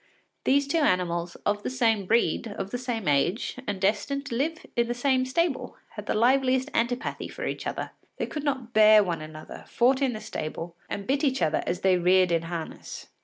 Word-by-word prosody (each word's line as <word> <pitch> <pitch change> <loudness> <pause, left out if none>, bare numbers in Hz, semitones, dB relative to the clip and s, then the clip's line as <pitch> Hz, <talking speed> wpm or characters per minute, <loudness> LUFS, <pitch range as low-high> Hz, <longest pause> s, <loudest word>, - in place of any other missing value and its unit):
These 280 +1 +3
two 330 +3 +1
animals, 175 - 0
of 205 0 +1
the - - -3
same 225 -6 +1
breed, 230 +1 +2
of 200 -2 -6
the 245 - -3
same 240 -5 -3
age, 145 - +1
and 205 -2 -2
destined 215 +8 0
to 240 - -4
live 315 +6 -2
in 235 -1 +2
the 240 - -2
same 255 0 +1
stable, 320 +2 -1
had 210 -1 -9
the - - 0
liveliest 260 +3 +3
antipathy 245 +4 -1
for - - -6
each - - -3
other. - - -4 0.3
They - - -1
could 300 - -5
not 260 -5 -2
bear 215 -1 +7
one 170 -4 -3
another, 155 0 -9
fought 260 +3 +2
in 265 -3 +2
the 215 - -5
stable, 165 -1 -6
and 200 - -4
bit 275 +3 0
each 265 - +1
other 155 -1 +1
as 180 - -2
they 190 -1 +4
reared 180 0 +4
in 165 -1 +2
harness. 170 -2 -7
230 Hz, 205 wpm, -27 LUFS, 185-260 Hz, 0.3 s, bear